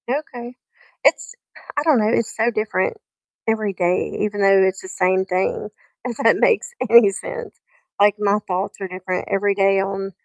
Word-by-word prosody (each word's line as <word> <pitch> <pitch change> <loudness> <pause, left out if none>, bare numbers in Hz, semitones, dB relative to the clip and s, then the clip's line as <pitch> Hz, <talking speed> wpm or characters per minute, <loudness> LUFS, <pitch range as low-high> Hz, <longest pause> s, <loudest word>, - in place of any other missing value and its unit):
Okay, 250 -3 -5 0.5
it's - - +2 0.4
I 290 - +1
don't 305 -6 +4
know, 215 0 +2
it's 230 -1 -1
so 225 +1 +1
different 215 - -1 0.5
every 215 -2 0
day, 180 -1 -1
even 205 -1 -2
though 195 -1 +5
it's 190 0 -3
the - - -10
same 185 0 +1
thing, 190 +2 -2 0.4
if 240 -3 -4
that - - +3
makes 480 0 +2 0.2
any 230 -3 +7
sense, 485 - -7 0.4
like, 205 0 +5
my 210 0 +2
thoughts 185 +1 -3
are 195 - -3
different 185 0 -5
every 200 +1 +1
day 195 0 +3
on 195 0 -4
200 Hz, 170 wpm, -20 LUFS, 190-230 Hz, 0.5 s, any